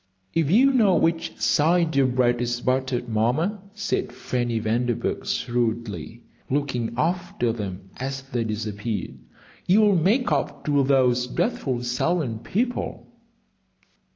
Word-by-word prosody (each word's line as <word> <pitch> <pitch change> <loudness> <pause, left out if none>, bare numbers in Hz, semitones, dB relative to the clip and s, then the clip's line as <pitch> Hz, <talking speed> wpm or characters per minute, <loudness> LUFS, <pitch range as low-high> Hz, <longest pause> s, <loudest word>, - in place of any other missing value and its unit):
"If 160 -3 +1
you 260 +9 +5
know 210 -8 +4
which 165 0 0
side 165 +1 +2
your 135 -1 +4
bread 125 -1 +2
is 120 0 -1
buttered, 130 0 -1
Mamma," 125 - 0
said 195 - -2
Fanny 120 -2 -2
Vanderburgh, 115 +2 -1
shrewdly, 120 -1 -2 0.3
looking 130 -5 -1
after 160 -6 0
them 95 -4 -6
as 135 +1 -4
they 125 -3 -2
disappeared, 105 -1 -4 0.5
"you'll 205 +1 +5
make 205 - +2
up - - -1
to 145 -1 +3
those 125 -2 +3
dreadful 130 - -1
Selwyn 125 0 -1
people." 240 - -3
130 Hz, 120 wpm, -24 LUFS, 120-165 Hz, 0.5 s, you